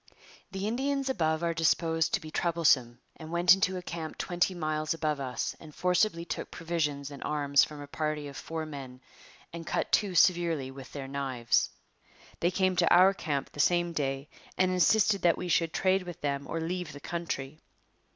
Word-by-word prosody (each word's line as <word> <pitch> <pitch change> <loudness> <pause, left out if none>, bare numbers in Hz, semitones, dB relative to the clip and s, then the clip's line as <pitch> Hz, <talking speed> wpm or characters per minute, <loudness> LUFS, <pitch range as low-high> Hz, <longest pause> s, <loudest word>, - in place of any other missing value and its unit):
The 195 +1 -3
Indians 270 +4 -1
above 160 -7 0
are 170 0 +1
disposed 165 +3 +2
to - - -2
be 155 -4 -10
troublesome 150 -9 +2 0.2
and 160 0 -9
went 175 +1 +6
into 190 -1 +1
a 180 - -6
camp 165 -2 -6
twenty 175 +1 0
miles 155 -1 -1
above 155 -3 -1
us 130 -2 -3
and 150 - -13
forcibly 180 -1 +1
took - - -5
provisions 150 -4 -2
and 140 - -8
arms 140 -2 +3
from 150 -1 -5
a - - -7
party 150 0 -3
of 140 - -9
four 160 +2 -5
men 135 -4 -8 0.5
and 170 -1 -7
cut - - -1
two 200 -4 +2
severely 165 -6 +3
with 135 -1 -11
their 140 -2 -6
knives. 130 -4 0 0.7
They 175 - +2
came 185 0 +1
to 170 -1 +3
our 185 +2 +7
camp 145 -7 -3
the - - -12
same 175 +2 +2
day 135 -2 -2 0.3
and 185 0 +3
insisted 200 +3 +3
that 170 -2 +3
we 180 - -4
should 165 -1 +2
trade 190 +2 +2
with 175 -2 -9
them 140 -1 -2
or 165 - -3
leave 175 0 -3
the 145 - -9
country. 155 -4 -4
165 Hz, 185 wpm, -29 LUFS, 145-180 Hz, 0.7 s, our